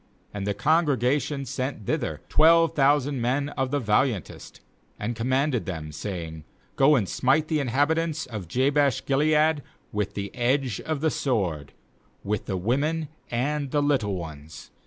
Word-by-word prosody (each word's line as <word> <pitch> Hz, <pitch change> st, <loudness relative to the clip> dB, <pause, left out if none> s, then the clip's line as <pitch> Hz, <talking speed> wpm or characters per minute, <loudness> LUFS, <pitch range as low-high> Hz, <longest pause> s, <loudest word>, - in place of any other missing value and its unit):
10And 100 Hz, -1 st, -4 dB
the 100 Hz, 0 st, -1 dB
congregation 145 Hz, 0 st, +1 dB
sent 130 Hz, -3 st, -4 dB
thither -, -, -2 dB
twelve 165 Hz, +1 st, +5 dB
thousand 140 Hz, -2 st, +2 dB
men 135 Hz, +4 st, 0 dB
of 135 Hz, -2 st, -2 dB
the 145 Hz, +2 st, 0 dB
vahantest, 110 Hz, -, -1 dB, 0.4 s
and 115 Hz, +3 st, -3 dB
commanded 130 Hz, +1 st, 0 dB
them, 80 Hz, -4 st, -5 dB
saying: 80 Hz, -1 st, -6 dB, 0.2 s
* -, -, -36 dB
Go 140 Hz, +2 st, +5 dB
and 110 Hz, -8 st, +1 dB
smite 135 Hz, +9 st, +1 dB
the 155 Hz, -2 st, +1 dB
inhabitants 155 Hz, +5 st, 0 dB
of 105 Hz, -7 st, -7 dB
Jabesh 135 Hz, -, +1 dB
gilead 150 Hz, +2 st, +3 dB, 0.3 s
with 105 Hz, -1 st, -2 dB
the 100 Hz, 0 st, -4 dB
edge 125 Hz, -2 st, 0 dB
of 155 Hz, -3 st, -3 dB
the 160 Hz, -1 st, +2 dB
sword, 90 Hz, -, -1 dB, 0.5 s
with 105 Hz, +1 st, -2 dB
the 95 Hz, -, -1 dB
women 145 Hz, -, 0 dB, 0.2 s
and 140 Hz, +4 st, -1 dB
the 145 Hz, +2 st, +1 dB
little 125 Hz, -9 st, +1 dB
ones. 80 Hz, -3 st, -9 dB
130 Hz, 150 wpm, -25 LUFS, 105-145 Hz, 0.5 s, twelve